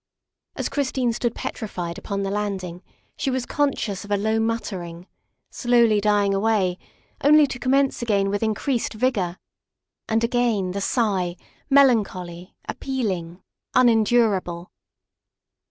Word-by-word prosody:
As - - -2
Christine 260 -4 0
stood 235 0 -2
petrified 175 -6 -5
upon 200 -1 -3
the 195 - -2
landing 190 -4 -3 0.3
she 275 - -2
was 260 -1 -1
conscious 245 -9 -1
of 205 - -12
a 205 - +2
low 220 +2 0
muttering, 190 -7 -3 0.5
slowly 235 -4 +3
dying 205 -1 +2
away, 195 -3 +1 0.4
only 300 +1 +7
to 265 -3 -6
commence 270 +1 +1
again 200 -4 +1
with 205 - -1
increased 225 +3 -1
vigor. 210 -7 0 0.7
And 225 +1 +1
again 230 -6 +1
the 200 +2 -3
sigh 195 -6 0 0.3
melancholy, 200 -10 +2
appealing, 190 -10 -3 0.3
unendurable. 220 -7 +2
215 Hz, 120 wpm, -23 LUFS, 190-245 Hz, 0.7 s, only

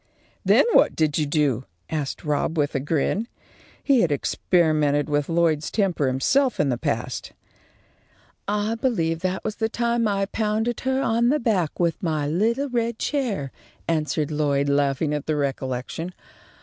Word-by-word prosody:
"Then - - +5
what - - +5
did 155 -1 +1
you 150 - 0
do?" 140 -5 +1 0.2
asked 150 -1 -4
Rob, 150 +2 0
with 145 -1 +1
a 135 - 0
grin. 160 - 0 0.6
He 270 -5 +4
had 165 - +2
experimented 150 -1 +1
with 145 0 0
Lloyd's 165 -3 +1
temper 185 -9 0
himself 245 - +1
in 150 - +2
the 125 - 0
past. - - -3 1.1
"I 210 +2 0
believe 185 -10 0
that 185 +2 0
that 190 - -7
was 215 -1 -4
the 220 0 0
time 235 -1 0
I 195 -1 0
pounded 220 +3 -1
her 265 +1 0
on 235 +1 +2
the 300 +3 +2
back 200 - 0
with 170 -2 0
my 155 -4 -1
little 225 - +1
red 235 -2 -1
chair," 225 - -2 0.4
answered 155 -2 0
Lloyd, 145 -2 +1
laughing 140 +1 +1
at 150 -1 -3
the 155 - +1
recollection. 140 +4 -3
165 Hz, 160 wpm, -24 LUFS, 145-220 Hz, 1.1 s, Then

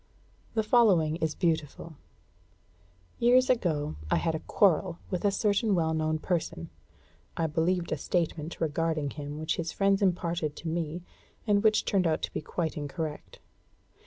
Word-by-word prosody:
The 220 - +2
following 195 -9 +4
is 160 -2 -1
beautiful: 165 -2 -2 1.3
"Years 255 +2 +5
ago 155 - -1
I - - +3
had 165 - 0
a 160 - -2
quarrel 180 -1 +2
with 180 - -2
a 205 - +4
certain 205 +1 +1
well 160 -2 +1
known 155 0 0
person 155 - -3 0.7
(I 165 - +1
believed 170 +3 0
a 155 - 0
statement 165 0 -2
regarding 160 -2 -1
him 145 0 -6
which 155 +1 -2
his 170 0 -3
friends 195 0 +2
imparted 170 -5 0
to 165 - -8
me, 165 +1 -3 0.4
and 205 -2 +3
which 215 0 +3
turned 190 -3 +2
out 160 -1 0
to - - -3
be - - -3
quite 160 0 -3
incorrect). 150 +1 -5
165 Hz, 155 wpm, -29 LUFS, 155-190 Hz, 1.3 s, Years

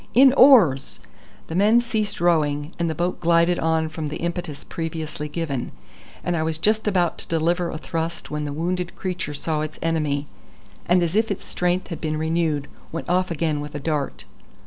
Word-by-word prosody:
In 265 +1 +8
oars!" 230 - +6 0.5
The - - -7
men 210 +6 +5
ceased 220 -4 -2
rowing, 150 -3 +1
the 165 -2 0
boat 175 +1 -1
glided 170 +1 +3
on 160 0 +1
from 155 -1 -4
the 150 - -4
impetus 170 -3 -4
previously 160 -2 -5
given, 150 -5 -3 0.5
and 175 - 0
I 160 - 0
was 160 0 -1
just 215 +5 +1
about 180 -4 +1
to - - -8
deliver 170 +2 +1
a 155 - -4
thrust 165 +1 -4
when 150 0 -2
the 145 - -3
wounded 175 +4 -2
creature 180 -6 -4
saw 155 +1 -1
its 155 0 -5
enemy, 150 -3 0 0.6
and 180 0 +4
as 170 +2 -1
if 225 +1 +2
its 200 - -3
strength 180 +1 -1
had 165 - -6
been 155 -1 -1
renewed, 160 -2 0 0.2
went 165 - -5
off 185 +1 +2
again 160 -3 -1
with 145 0 -7
a - - -2
dart. 150 -1 -2
165 Hz, 185 wpm, -23 LUFS, 155-180 Hz, 0.6 s, In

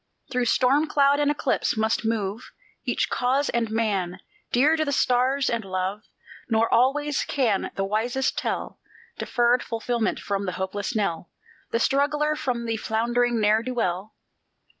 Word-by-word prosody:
Through 250 -1 +1
storm 275 +6 +3
cloud 285 -1 +3
and 290 0 +2
eclipse 285 -5 0
must 220 +1 +1
move 220 0 -2 0.3
Each - - 0
cause 265 +3 0
and 235 -2 0
man, 200 -5 -1 0.3
dear 285 +6 +4
to 315 - +1
the 285 - -2
stars 260 +1 +2
and 235 -1 0
Jove; 190 +1 -3 0.5
Nor 225 0 +3
always 290 +4 +2
can 235 -9 0
the 195 - -1
wisest 235 +6 0
tell - - -3 0.4
Deferred 240 0 +2
fulfilment 230 -1 -2
from 200 -1 -3
the 185 - -2
hopeless 200 +4 -3
knell 175 -5 -1 0.4
The - - 0
struggler 295 +4 +1
from 245 -5 -2
the 225 -1 -1
floundering 235 +2 0
ne'er 215 +1 +3
do 255 +2 -5
well. 190 -2 -2
235 Hz, 150 wpm, -25 LUFS, 215-265 Hz, 0.5 s, dear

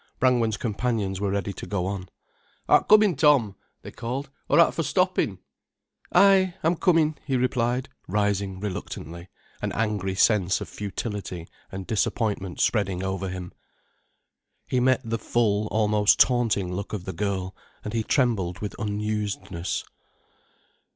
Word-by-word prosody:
Brangwen's 120 -4 +2
companions 105 -4 -2
were 100 - 0
ready 100 0 -2
to - - -8
go 90 -3 -1
on. 95 -1 -4 0.6
"Art - - +4
commin', 210 -4 +6
Tom," 135 -8 +4 0.3
they - - -8
called, 130 +5 -5 0.2
"or - - +4
art - - +6
for - - -1
stoppin'?" - - +1 0.7
"Ay, 190 -2 +5
I'm 165 +2 +3
commin'," 160 -3 +2
he 135 -3 0
replied, 125 +1 0 0.2
rising 100 -1 0
reluctantly, 90 -3 -6 0.3
an - - -2
angry 105 -3 -1
sense 100 -2 +3
of - - -6
futility 100 -4 -5 0.2
and 95 0 -6
disappointment 105 -3 -1
spreading 95 -4 +1
over 95 0 -2
him. 90 -1 -6 1.1
He 130 - 0
met 130 +1 +3
the 115 -1 -3
full, 105 -3 +1
almost 105 -1 +3
taunting 115 -7 +3
look 100 +3 -5
of 95 -4 -4
the 95 - -4
girl, 95 0 -3 0.3
and 105 - -4
he 115 - +1
trembled 110 -8 +1
with 105 0 -5
unusedness. 105 -4 -3
105 Hz, 135 wpm, -25 LUFS, 95-120 Hz, 1.1 s, commin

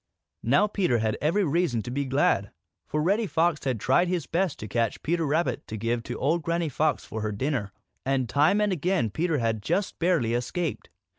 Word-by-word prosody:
Now 140 - +4
Peter 190 - +1
had 110 -1 0
every 170 +8 +2
reason 150 - +1
to 120 - -6
be 140 +2 -1
glad, 130 -7 +2 0.4
for 150 0 -1
Reddy 205 +6 +2
Fox 165 -2 +1
had 130 -4 0
tried 135 - +3
his 175 -5 -1
best 175 +1 0
to 110 - -7
catch 115 0 -1
Peter 165 0 0
Rabbit 145 -4 0
to 110 - -5
give 115 +2 -1
to - - -4
old 160 +5 +1
Granny 170 +1 -1
Fox 150 +2 0
for 110 - -5
her 105 0 -1
dinner, 115 -1 -2 0.3
and 135 -2 0
time 155 - +3
and 210 -1 +2
again 175 - 0
Peter 165 - 0
had 115 -3 0
just 195 - -1
barely 165 -10 +2
escaped. 145 +7 -2
145 Hz, 200 wpm, -26 LUFS, 120-175 Hz, 0.4 s, Now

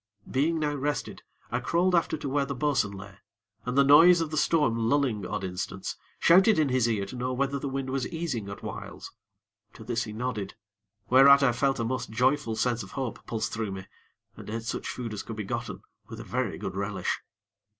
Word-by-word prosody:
Being 155 +5 +1
now 150 -2 0
rested, 145 -3 -3 0.3
I 120 - 0
crawled 170 +9 +1
after 170 -2 +2
to 145 - -5
where 140 +1 +1
the 140 - -3
bo'sun 135 -6 +1
lay, 95 0 -11 0.5
and, 125 +2 -2
the 140 - +7
noise 165 +5 +7
of 160 -2 -2
the - - -2
storm 115 -8 +2
lulling 125 -8 +1
odd 105 -2 -3
instants, 95 +1 -4 0.2
shouted 190 +5 +5
in 155 -3 +2
his 125 -2 +2
ear 105 -3 0
to 100 - -9
know 125 +1 -2
whether 140 +2 -1
the 140 - -3
wind 135 -1 -3
was 135 -1 -1
easing 145 -12 -4
at 100 - -8
whiles. - - -7 0.6
To - - -12
this 120 +1 -2
he 110 - -7
nodded, 110 -4 -4 0.6
whereat 140 +2 +8
I 130 - +5
felt 135 +2 0
a - - 0
most 125 0 -2
joyful 125 +1 +1
sense 120 0 0
of 95 - -10
hope 130 -4 -4
pulse 115 -2 -1
through 110 -3 -4
me, 95 0 -7 0.5
and - - -10
ate 115 +1 -4
such 115 - -4
food 120 -3 -5
as 105 - -4
could 115 - -7
be 105 - -4
gotten, 95 - -5 0.2
with - - -9
a - - -6
very - - -2
good 95 -1 -5
relish. 100 0 -2
125 Hz, 210 wpm, -27 LUFS, 110-140 Hz, 0.6 s, whereat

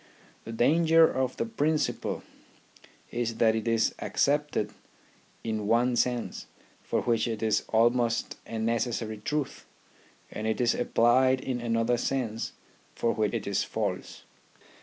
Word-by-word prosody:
The 115 - -6
danger 160 +7 +5
of 130 -1 -2
the - - -1
principle 160 -9 -1 0.9
is 115 -1 -2
that 110 -1 +4
it 110 0 -3
is 115 -1 +2
accepted 145 -5 0 0.7
in 110 -2 -2
one 120 +2 +3
sense, 120 -1 -1 0.3
for - - -1
which 115 -1 +1
it 110 -1 -3
is 110 -1 +2
almost 120 +1 +2
a 115 - -5
necessary 115 -1 -1
truth, 150 +4 -3 0.6
and 110 +1 -4
it 110 - -1
is 120 -1 +3
applied 130 +2 +3
in 125 -2 -3
another 115 +1 +1
sense 115 -3 -2 0.4
for 115 - +1
which 110 +1 0
it 115 - -3
is 100 -1 0
false. - - -4
120 Hz, 135 wpm, -28 LUFS, 110-130 Hz, 0.9 s, danger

